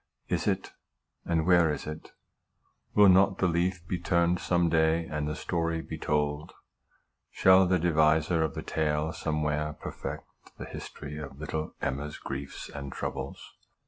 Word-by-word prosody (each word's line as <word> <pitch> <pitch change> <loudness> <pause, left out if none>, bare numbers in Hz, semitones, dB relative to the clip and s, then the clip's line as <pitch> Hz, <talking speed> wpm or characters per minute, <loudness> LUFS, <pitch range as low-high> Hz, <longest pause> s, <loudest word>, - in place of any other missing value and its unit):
Is - - 0
it? - - -1 0.5
And 80 -2 +1
where 85 -3 +5
is 75 - -4
it? 75 0 -7 0.8
Will 105 -1 +8
not 95 +1 +5
the 90 - +2
leaf 85 +1 0
be 90 - -2
turned 85 0 +2
some 85 -1 +2
day, 80 0 +2
and 75 -1 -3
the 75 - -2
story 85 -1 -1
be 80 - -7
told? 75 0 -1 0.8
Shall 95 0 +5
the 90 0 +3
deviser 80 0 +3
of 80 - -2
the - - -4
tale 75 0 -1
somewhere 75 0 -1
perfect - - -6 0.3
the - - -6
history 75 +1 -8
of 70 -2 -8
little 80 0 -4
EMMA'S 75 +2 -3
griefs 70 0 -6
and 70 -1 -7
troubles? - - -5
80 Hz, 150 wpm, -29 LUFS, 75-85 Hz, 0.8 s, Will